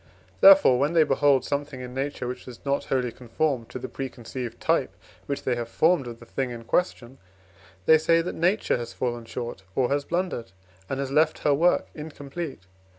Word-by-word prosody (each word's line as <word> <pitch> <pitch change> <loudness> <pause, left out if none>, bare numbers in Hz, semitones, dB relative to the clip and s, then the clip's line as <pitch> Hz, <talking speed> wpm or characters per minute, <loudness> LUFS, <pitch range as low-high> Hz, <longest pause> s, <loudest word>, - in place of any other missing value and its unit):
Therefore, 290 - +8
when 145 +4 +1
they 165 -2 +6
behold 140 -3 +3
something 145 -2 -3
in 125 0 -7
Nature, 135 -1 -3
which 125 - -6
does 125 0 -12
not 140 0 0
wholly 125 -2 0
conform 125 +1 -2
to 130 - -8
the 130 +1 -6
preconceived 125 -2 -6
type - - 0 0.3
which 140 - -3
they 130 - +1
have 120 -1 -4
formed 160 -1 +2
of 115 -1 -8
the 120 - -13
thing 130 +2 -3
in 120 -1 -7
question, 130 -4 -1 0.7
they 160 +6 +7
say 165 +1 +3
that 180 - -4
Nature 180 +6 +1
has 120 -1 -6
fallen 120 -2 -3
short 120 -3 -6
or 130 -2 +2
has 140 0 +1
blundered, 170 - -3 0.4
and 135 - -2
has 135 -1 -3
left 155 +2 +2
her 145 - +4
work 170 +5 +3
incomplete. 150 - -7
135 Hz, 190 wpm, -26 LUFS, 120-155 Hz, 0.7 s, Therefore